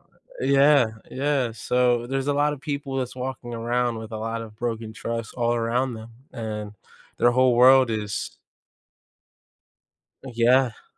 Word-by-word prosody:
Uh, -, -, -34 dB, 0.4 s
yeah 140 Hz, -2 st, +5 dB, 0.2 s
yeah, 135 Hz, -3 st, 0 dB
so 120 Hz, +1 st, +1 dB
there's 135 Hz, 0 st, -2 dB
a 145 Hz, -, +2 dB
lot 145 Hz, +1 st, +1 dB
of 140 Hz, -, -8 dB
people 140 Hz, -2 st, -4 dB
that's 125 Hz, -2 st, -3 dB
walking 125 Hz, -2 st, -5 dB
around 120 Hz, 0 st, -1 dB
with 110 Hz, 0 st, -8 dB
a -, -, -3 dB
lot 115 Hz, +1 st, -3 dB
of 110 Hz, -1 st, -11 dB
broken 115 Hz, -2 st, -4 dB
trust 115 Hz, 0 st, -5 dB
all 120 Hz, -1 st, 0 dB
around 120 Hz, +2 st, 0 dB
them, 110 Hz, +1 st, -10 dB, 0.2 s
and 105 Hz, -2 st, -5 dB, 0.4 s
their 120 Hz, -, +4 dB
whole 130 Hz, 0 st, +3 dB
world 130 Hz, 0 st, +6 dB
is 105 Hz, -2 st, -4 dB, 1.9 s
Yeah. 125 Hz, -1 st, +1 dB
120 Hz, 150 wpm, -24 LUFS, 115-130 Hz, 1.9 s, world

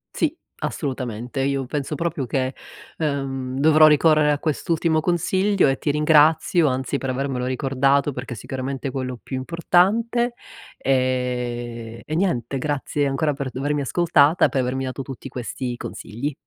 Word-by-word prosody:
Sì, -, -, +1 dB, 0.3 s
assolutamente. 125 Hz, -2 st, -3 dB
Io 135 Hz, 0 st, 0 dB
penso 145 Hz, +3 st, -3 dB
proprio 160 Hz, -3 st, -2 dB
che, 130 Hz, +1 st, -1 dB, 0.4 s
ehm, 135 Hz, -4 st, -2 dB
dovrò 155 Hz, +2 st, +6 dB
ricorrere 150 Hz, 0 st, +4 dB
a 145 Hz, -, +1 dB
quest'ultimo 160 Hz, +1 st, 0 dB
consiglio, 185 Hz, +3 st, +2 dB
e 135 Hz, 0 st, 0 dB
ti -, -, -2 dB
ringrazio, 155 Hz, +2 st, +4 dB
anzi, 130 Hz, +1 st, -1 dB
per 135 Hz, -, -4 dB
avermelo 130 Hz, -1 st, -2 dB
ricordato, 135 Hz, +2 st, +1 dB
perché 125 Hz, -1 st, -6 dB
è -, -, -11 dB
sicuramente 130 Hz, +3 st, -4 dB
quello 130 Hz, -1 st, -4 dB
più 130 Hz, -, -5 dB
importante. 200 Hz, -, +2 dB, 0.4 s
Ehm, 125 Hz, -3 st, -2 dB
e 155 Hz, -, -3 dB
niente. 135 Hz, -, 0 dB
Grazie 145 Hz, 0 st, -1 dB
ancora 145 Hz, +2 st, 0 dB
per 140 Hz, -1 st, -4 dB
d -, -, -9 dB
avermi 145 Hz, +2 st, 0 dB
ascoltata 155 Hz, +1 st, +3 dB
e -, -, +2 dB
per 135 Hz, -3 st, 0 dB
avermi 130 Hz, +1 st, -2 dB
dato 130 Hz, +1 st, -4 dB
tutti 135 Hz, 0 st, -8 dB
questi 125 Hz, 0 st, -4 dB
consigli. 135 Hz, +7 st, -5 dB
140 Hz, 150 wpm, -22 LUFS, 130-155 Hz, 0.4 s, dovrò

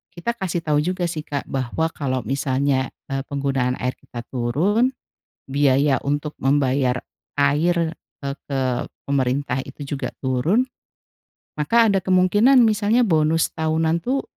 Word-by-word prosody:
kita 175 Hz, +7 st, -2 dB
kasih 175 Hz, -3 st, -2 dB
tau 150 Hz, -2 st, +2 dB
juga 175 Hz, +3 st, -1 dB
sih 155 Hz, -2 st, -5 dB
Kak 140 Hz, -1 st, -3 dB
bahwa 135 Hz, +5 st, -1 dB
kalau 130 Hz, -5 st, -2 dB
misalnya, 130 Hz, +2 st, 0 dB, 0.2 s
eee, 135 Hz, 0 st, -1 dB
penggunaan 135 Hz, -3 st, 0 dB
air 125 Hz, 0 st, -2 dB
kita 120 Hz, -1 st, -8 dB
turun, 185 Hz, -, +1 dB, 0.5 s
biaya 140 Hz, -1 st, +2 dB
untuk 145 Hz, +1 st, -2 dB
membayar 135 Hz, -2 st, +1 dB, 0.3 s
air, 145 Hz, +5 st, +2 dB, 0.5 s
eee, 140 Hz, 0 st, -2 dB
ke 135 Hz, -2 st, -1 dB, 0.4 s
pemerintah 135 Hz, -1 st, 0 dB
itu 140 Hz, +2 st, -8 dB
juga -, -, -3 dB, 0.2 s
turun, 150 Hz, -, +2 dB, 0.9 s
maka 225 Hz, +10 st, +3 dB
ada 195 Hz, -3 st, +1 dB
kemungkinan 205 Hz, +8 st, +5 dB
misalnya 215 Hz, +2 st, +2 dB
bonus 160 Hz, -4 st, +2 dB
tahunan 160 Hz, +1 st, +1 dB
tuh, 265 Hz, +2 st, 0 dB
145 Hz, 130 wpm, -22 LUFS, 135-175 Hz, 0.9 s, kemungkinan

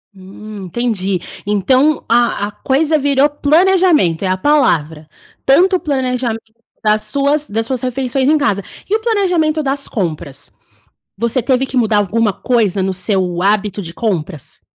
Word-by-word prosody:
Hum, 195 Hz, +1 st, -10 dB
entendi. 195 Hz, -2 st, -2 dB, 0.3 s
Então, 255 Hz, +9 st, +2 dB
a 235 Hz, -3 st, +2 dB
a -, -, -8 dB
coisa 300 Hz, +7 st, 0 dB
virou 280 Hz, 0 st, +3 dB
planejamento, 310 Hz, -, +2 dB
é -, -, 0 dB
a 185 Hz, 0 st, 0 dB
palavra. 160 Hz, -, +1 dB, 0.4 s
Tanto 365 Hz, +8 st, +4 dB
o -, -, -11 dB
planejamento 250 Hz, -6 st, -2 dB, 0.3 s
das 215 Hz, 0 st, +2 dB
suas 280 Hz, +6 st, 0 dB
das 225 Hz, +2 st, -1 dB
suas 255 Hz, 0 st, -3 dB
refeições 260 Hz, +1 st, -1 dB
em 310 Hz, -, +4 dB
casa. 215 Hz, -9 st, 0 dB, 0.3 s
E 420 Hz, -, +2 dB
o -, -, +1 dB
planejamento 360 Hz, -9 st, +1 dB
das 275 Hz, 0 st, -3 dB
compras? 155 Hz, -, -5 dB, 0.7 s
Você 235 Hz, +4 st, -1 dB
teve 260 Hz, +2 st, +1 dB
que 265 Hz, -, -7 dB
mudar 225 Hz, -3 st, +2 dB
alguma 205 Hz, +2 st, +1 dB
coisa 215 Hz, -4 st, 0 dB
no 190 Hz, 0 st, -1 dB
seu 185 Hz, -2 st, -1 dB
hábito 205 Hz, 0 st, 0 dB
de 170 Hz, -2 st, -8 dB
compras? 165 Hz, -, -4 dB
235 Hz, 150 wpm, -16 LUFS, 195-285 Hz, 0.7 s, Tanto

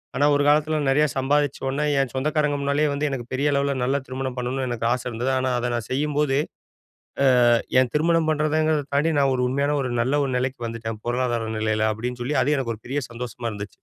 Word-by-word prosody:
ஆனா, 140 Hz, +3 st, +3 dB
ஒரு 145 Hz, -, +2 dB
காலத்தில 155 Hz, +1 st, +3 dB
நெறையா 150 Hz, +3 st, +3 dB
சம்பாதிச்ச 140 Hz, +1 st, +1 dB
உடனே 140 Hz, +3 st, -1 dB
என் 135 Hz, -3 st, 0 dB
சொந்தக்காரங்க 150 Hz, +1 st, 0 dB
முன்னாலேயே 140 Hz, +2 st, +1 dB
வந்து 145 Hz, +1 st, -1 dB
எனக்கு 130 Hz, -3 st, -4 dB
பெரிய 140 Hz, +3 st, +1 dB
அளவுல 140 Hz, 0 st, +1 dB
நல்ல 135 Hz, +3 st, +1 dB
திருமணம் 130 Hz, 0 st, -4 dB
பண்ணணுனு 130 Hz, +1 st, -2 dB
எனக்கு 120 Hz, -1 st, -3 dB
ஆசை 125 Hz, 0 st, -4 dB
இருந்தது. 125 Hz, +3 st, -2 dB
ஆனா, 130 Hz, 0 st, 0 dB
அத 120 Hz, 0 st, -2 dB
நான் 120 Hz, -2 st, -4 dB
செய்யும்போது, 145 Hz, 0 st, +1 dB, 1.2 s
ஆ, -, -, +5 dB, 0.3 s
என் 125 Hz, -, -1 dB
திருமணம் 165 Hz, +1 st, +2 dB
பண்றதுங்றத 155 Hz, 0 st, +1 dB
தாண்டி 155 Hz, +3 st, +2 dB
நான் 135 Hz, -1 st, +3 dB
ஒரு 125 Hz, -, 0 dB
உண்மையான 140 Hz, +3 st, 0 dB
ஒரு 125 Hz, -, -3 dB
நல்ல 140 Hz, +5 st, +1 dB
ஒரு 135 Hz, -, -3 dB
நிலைக்கு 130 Hz, 0 st, -3 dB
வந்துட்டேன். 115 Hz, -1 st, -5 dB
பொருளாதார 120 Hz, -2 st, -1 dB
நிலையில 110 Hz, 0 st, +1 dB
அப்பிடின்னு 120 Hz, +3 st, -5 dB
சொல்லி, 145 Hz, +5 st, -1 dB
அது 150 Hz, -, +2 dB
எனக்கு 120 Hz, -4 st, -2 dB
ஒரு 110 Hz, -, -20 dB
பெரிய 145 Hz, +3 st, -1 dB
சந்தோஷமா 120 Hz, 0 st, -5 dB
இருந்துச்சு. 100 Hz, -1 st, -6 dB
135 Hz, 200 wpm, -23 LUFS, 125-145 Hz, 1.2 s, ஆ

